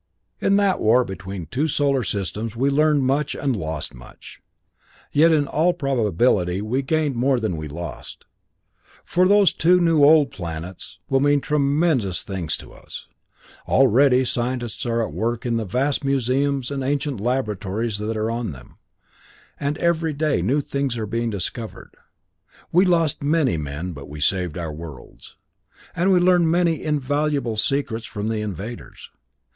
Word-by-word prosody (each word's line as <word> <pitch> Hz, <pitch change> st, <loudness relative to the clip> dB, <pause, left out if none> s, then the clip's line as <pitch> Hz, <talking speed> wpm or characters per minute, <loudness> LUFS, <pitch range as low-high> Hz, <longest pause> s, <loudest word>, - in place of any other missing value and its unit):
In 195 Hz, -, +2 dB
that 200 Hz, -2 st, +2 dB
war 120 Hz, +4 st, +4 dB
between 95 Hz, -1 st, -7 dB
two 135 Hz, -, -1 dB
solar 140 Hz, -3 st, +1 dB
systems 105 Hz, +4 st, -3 dB
we 135 Hz, +4 st, +1 dB
learned 150 Hz, 0 st, +3 dB
much 140 Hz, +3 st, 0 dB
and 135 Hz, -3 st, -1 dB
lost 80 Hz, -5 st, -4 dB
much. -, -, -14 dB, 0.7 s
Yet, 160 Hz, +3 st, +5 dB
in 150 Hz, -2 st, +3 dB
all 160 Hz, +5 st, +1 dB
probability 110 Hz, -, +1 dB
we 115 Hz, +6 st, -1 dB
gained 150 Hz, +1 st, 0 dB
more 130 Hz, +2 st, +2 dB
than 110 Hz, -6 st, -2 dB
we 80 Hz, -1 st, -5 dB
lost, 85 Hz, +3 st, -8 dB, 0.8 s
for 180 Hz, +1 st, +2 dB
those 200 Hz, -2 st, +5 dB
two 180 Hz, +2 st, +4 dB
new 165 Hz, -4 st, +3 dB
old 150 Hz, -1 st, +6 dB
planets 85 Hz, +1 st, -7 dB
will 135 Hz, -, +2 dB
mean 145 Hz, +1 st, +3 dB
tremendous 140 Hz, -, +1 dB
things 85 Hz, -8 st, -3 dB
to -, -, -13 dB
us. -, -, -11 dB, 0.6 s
Already 130 Hz, 0 st, +4 dB
scientists 120 Hz, -1 st, -2 dB
are 115 Hz, 0 st, +1 dB
at -, -, -8 dB
work 115 Hz, +1 st, -2 dB
in 120 Hz, -1 st, 0 dB
the 115 Hz, -, -2 dB
vast 135 Hz, +10 st, 0 dB
museums 135 Hz, 0 st, 0 dB
and 135 Hz, -1 st, -3 dB
ancient 140 Hz, -2 st, -1 dB
laboratories 110 Hz, -2 st, -2 dB
that 110 Hz, +1 st, -3 dB
are 110 Hz, +1 st, -1 dB
on 115 Hz, -7 st, -3 dB
them, 60 Hz, -2 st, -15 dB, 0.8 s
and 145 Hz, +2 st, -2 dB
every 165 Hz, -2 st, +1 dB
day 150 Hz, +1 st, 0 dB
new 145 Hz, +4 st, +1 dB
things 140 Hz, -3 st, -2 dB
are 110 Hz, -, -2 dB
being 115 Hz, +2 st, -2 dB
discovered. 110 Hz, +3 st, -5 dB, 0.8 s
We 180 Hz, +3 st, +5 dB
lost 165 Hz, -4 st, +2 dB
many 145 Hz, -, +2 dB
men, 75 Hz, +4 st, -4 dB
but 70 Hz, -2 st, -10 dB
we 75 Hz, +1 st, -8 dB
saved 90 Hz, +1 st, 0 dB
our 80 Hz, -3 st, -4 dB
worlds, 75 Hz, -5 st, -11 dB, 0.6 s
and 180 Hz, +3 st, +2 dB
we 185 Hz, -, +5 dB
learned 175 Hz, -2 st, +4 dB
many 170 Hz, -1 st, +2 dB
invaluable 145 Hz, -4 st, -1 dB
secrets 115 Hz, 0 st, -1 dB
from 105 Hz, +1 st, -4 dB
the 110 Hz, -1 st, -1 dB
invaders. 105 Hz, +3 st, -7 dB
125 Hz, 155 wpm, -22 LUFS, 105-145 Hz, 0.8 s, old